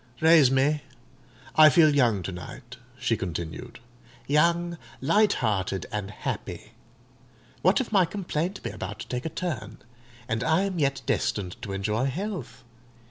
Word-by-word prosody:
Raise 160 -4 +6
me. 140 +3 +2 0.7
I 155 0 +9
feel 155 +1 +5
young 115 -8 +3
to 95 - -4
night," 120 +7 -9 0.2
she 120 -2 0
continued: 85 +5 -6 0.5
"young, 170 +3 +2 0.2
light 200 +9 +3
hearted, 95 -5 -1
and 105 -2 -3
happy. 105 - -5 0.9
What 185 +3 +4
if 260 - -3
my 195 -4 +5
complaint 180 0 -3
be - - -3
about - - -6
to - - -8
take 125 +4 -3
a - - -3
turn, 130 - -4 0.5
and 110 +1 -1
I 160 +6 +3
am 195 -3 -2
yet 140 -2 0
destined 90 -4 -1
to 100 - -6
enjoy 105 +5 -1
health? 170 - -4
135 Hz, 145 wpm, -26 LUFS, 105-165 Hz, 0.9 s, I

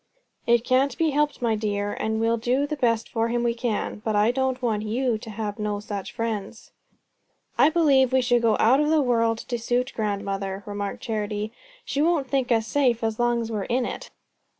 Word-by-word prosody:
"It 235 -1 +4
can't 265 +2 +2
be 325 -2 +2
helped, 295 -2 0
my 230 -2 +2
dear, 205 -1 -2
and 220 0 -2
we'll 230 +1 +2
do 250 +5 +1
the 300 +1 -3
best 230 -5 +1
for 225 0 -1
him 240 +1 -1
we 235 -1 +1
can. 230 -3 -3
But 220 -2 -1
I 210 +3 +4
don't 260 0 -1
want 225 -4 0
you 230 +1 -1
to 220 - -10
have 210 0 -5
no 210 -1 -2
such 205 -2 -6
friends." 225 -1 -5 0.8
"I - - +5
believe 280 -6 +3
we 260 0 +3
should 245 -1 +3
go 225 -2 +3
out 255 +5 +5
of 300 0 +2
the 315 0 +4
world 230 -4 +2
to 240 +1 -4
suit 245 +3 -1
grandmother," 200 -2 -3
remarked 205 -1 -5
Charity. 215 -1 -3 0.3
"She 280 - -1
won't 315 -4 +2
think 255 -1 0
us 225 -2 +3
safe 245 -2 +1
as 225 0 -1
long 240 0 +2
as 230 0 -5
we're 210 -3 -2
in 245 +1 0
it." - - -6
230 Hz, 205 wpm, -25 LUFS, 215-255 Hz, 0.8 s, I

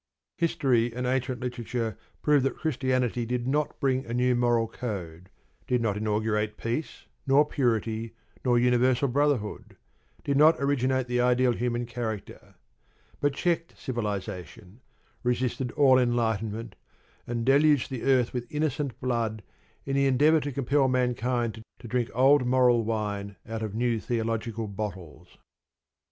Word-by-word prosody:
History 130 -8 +2
and 125 0 -2
ancient 130 -1 -1
literature 120 -3 -3 0.3
prove 150 -2 +4
that 135 - -1
Christianity 130 -5 0
did 120 +1 -2
not 145 +3 -1
bring 130 -1 +1
a 115 -1 -5
new 125 0 +2
moral 120 -1 +2
code, 90 -8 -6 0.4
did 125 - +2
not 110 -4 0
inaugurate 105 0 -1
peace, 120 +7 -4 0.2
nor 140 +2 +5
purity, 115 -5 -1 0.3
nor 125 -2 +3
universal 125 +2 +3
brotherhood, 135 -5 -1 0.5
did 140 -1 0
not 155 +3 +7
originate 130 -1 +1
the 125 0 +1
ideal 125 0 +3
human 120 0 -1
character: 115 -3 -6 0.6
but 145 -1 0
checked 170 0 -1
civilisation, 105 - -5 0.4
resisted 125 +1 -1
all 130 -3 +5
enlightenment, 115 -3 -1 0.5
and 115 -1 -2
deluged 145 0 +4
the 130 -3 -4
earth 130 -3 +2
with 120 -1 -5
innocent 150 -3 -2
blood 115 -4 -1 0.4
in 135 - -2
the 140 0 +3
endeavour 150 +5 +4
to 145 -1 -4
compel 135 +1 +1
mankind 125 -2 0 0.2
to - - -11
drink 120 0 -1
old 135 +2 +5
moral 125 -2 +3
wine 105 -2 -3
out 115 -1 -4
of 110 -2 -4
new 120 -1 +1
theological 115 -1 -2
bottles. 95 -6 -7
125 Hz, 135 wpm, -27 LUFS, 115-130 Hz, 0.6 s, not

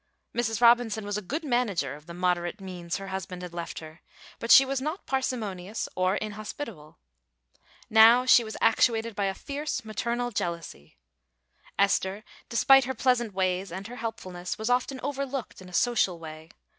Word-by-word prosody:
Mrs. 225 -2 -1
Robinson 235 -3 +4
was 205 0 -3
a - - -9
good 290 - -4
manager 235 - 0
of 150 +2 -13
the 170 - -8
moderate 180 +2 0
means 180 -3 -5
her 195 -1 -7
husband 190 -1 -5
had 175 -1 -8
left 170 -1 -5
her, 155 0 -10 0.4
but 230 - -5
she 270 - +9
was 270 0 -2
not 310 +7 -4
parsimonious 220 -7 -3
or 185 +1 +1
inhospitable. 215 - -6 0.9
Now 225 +3 +7
she 245 -2 +7
was 220 -1 -7
actuated 225 0 +2
by 200 - 0
a 195 0 -1
fierce 285 -3 -4
maternal 235 +3 -2
jealousy. 170 - -5 0.8
Esther, 200 +1 +1 0.3
despite 270 +2 +5
her 260 +1 -3
pleasant 240 -4 +1
ways 185 0 0
and 190 +3 -6
her 245 +3 -8
helpfulness, 185 -7 -5
was 220 +3 -1
often 255 +2 0
overlooked 275 -5 -4
in 185 - -11
a - - -14
social 195 -2 +2
way. 160 0 -10
215 Hz, 165 wpm, -27 LUFS, 180-245 Hz, 0.9 s, she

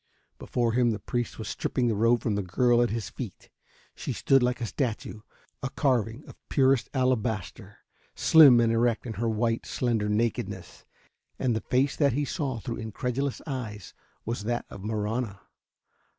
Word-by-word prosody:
Before 120 -2 -1
him 120 0 +3
the 110 - -1
priest 120 +4 -3
was 110 - -6
stripping 125 - -1
the 115 - +2
robe 115 +3 +3
from 110 - -1
the 100 - 0
girl 120 +6 +2
at 120 - +2
his 110 -3 -4
feet. - - -8 0.4
She - - -4
stood 135 -1 +3
like 125 0 +1
a 120 - -2
statue, 115 -3 -3 0.4
a 135 - -2
carving 125 -2 0
of - - -12
purest 135 -2 +3
alabaster, 125 -6 -1 0.4
slim 145 -7 +7
and 115 -1 +3
erect 115 0 +1
in 115 - -4
her 115 +2 -1
white, 115 +1 -1
slender 115 -4 0
nakedness. 110 +2 -2 0.5
And 125 -3 0
the 110 - -1
face 130 +2 +1
that 140 -5 +3
he 145 +3 0
saw 135 -2 -2
through 115 +2 -5
incredulous 125 +3 -3
eyes 120 -8 -6 0.3
was 115 -2 -3
that 120 +1 -1
of 95 - -9
Marahna. 110 0 -2
120 Hz, 165 wpm, -27 LUFS, 110-125 Hz, 0.5 s, slim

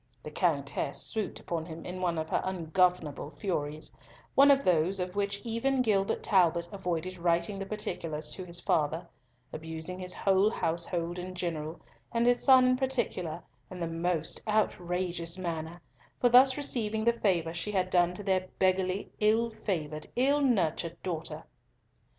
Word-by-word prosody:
The - - -7
Countess - - 0
swooped 220 -3 -3
upon 165 -1 -4
him 165 -1 -8
in 180 +1 -6
one 175 -2 0
of 160 0 -2
her - - +1
ungovernable 175 -4 0
furies—one 170 - 0
of 275 0 +5
those 180 +2 +2
of 180 +1 -3
which 200 0 -1
even 250 +3 0
Gilbert 200 -4 +1
Talbot 175 -4 +3
avoided 185 -2 -3
writing 170 +3 +1
the 195 - -5
particulars 165 -7 -4
to 185 - -6
his 175 -1 -4
father—abusing 160 +2 -3
his 180 -1 -3
whole 195 +1 +3
household 170 -1 -2
in 185 +1 -6
general, 165 -2 -4 0.3
and 235 0 +1
his 245 0 +3
son 260 -2 +7
in 255 0 +3
particular, 240 - -2 0.3
in 185 - -8
the 170 - -2
most 165 -1 -1
outrageous 180 -4 0
manner, 170 -2 -4 0.4
for 245 - +4
thus 260 +2 +7
receiving 220 -6 0
the 235 +1 +4
favour 175 -8 0
she 175 +5 -2
had 185 -2 0
done 175 0 +3
to 205 - -5
their 190 -1 +1
beggarly, 185 +1 +1
ill 225 +2 +3
favoured, 155 -8 -3
ill 280 +4 +3
nurtured 175 - +1
daughter. 165 -4 -4
180 Hz, 150 wpm, -30 LUFS, 165-210 Hz, 0.4 s, son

